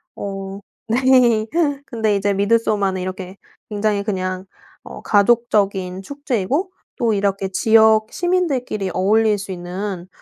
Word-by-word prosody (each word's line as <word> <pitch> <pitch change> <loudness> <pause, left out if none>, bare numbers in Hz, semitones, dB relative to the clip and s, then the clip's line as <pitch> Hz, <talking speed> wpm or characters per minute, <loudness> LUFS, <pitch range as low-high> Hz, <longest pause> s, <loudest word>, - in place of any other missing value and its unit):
어 195 0 -6 0.3
네. 240 -2 +3 0.4
근데 220 -3 0
이제 200 0 0
미드소마는 200 -2 +1
이렇게 185 0 -6 0.3
굉장히 205 -1 0
그냥 185 -2 -3 0.4
어 - - -10
가족적인 200 -4 +1
축제이고 285 - -2 0.3
또 235 -4 +1
이렇게 195 -1 0
지역 220 +2 +4
시민들끼리 275 - -1
어울릴 210 +3 +2
수 195 0 -7
있는 180 +1 -5
205 Hz, 265 characters per minute, -20 LUFS, 195-230 Hz, 0.4 s, 지역